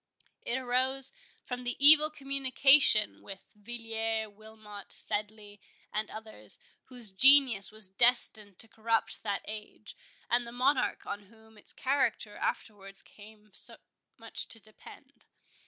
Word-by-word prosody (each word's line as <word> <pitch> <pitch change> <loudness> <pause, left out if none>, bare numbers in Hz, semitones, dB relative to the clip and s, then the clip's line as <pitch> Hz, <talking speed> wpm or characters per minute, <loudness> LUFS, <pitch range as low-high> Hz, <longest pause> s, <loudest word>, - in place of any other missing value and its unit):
It 240 - -3
arose 260 +1 -2 0.3
from 250 0 -7
the 245 0 -3
evil 305 +2 +8
communication 275 -5 +3
with 195 -1 -14
Villiers, 225 0 -5
Wilmot, 210 -1 -14
Sedley, 205 -1 -5 0.3
and 215 0 -4
others, 215 - -11 0.3
whose 245 -5 -3
genius 255 -1 +6
was 215 -2 0
destined 210 -1 0
to 225 - -7
corrupt 225 0 -3
that 200 -2 -5
age, 215 0 -10 0.3
and 240 0 -1
the - - -10
Monarch 255 +3 -1
on 205 0 -8
whom 220 +1 -21
its 210 - -12
character 255 -6 -2
afterwards 195 -2 -6
came 210 0 -19
so - - -1 0.4
much - - -7
to 225 - -8
depend. 215 0 -19
220 Hz, 125 wpm, -28 LUFS, 210-250 Hz, 0.4 s, evil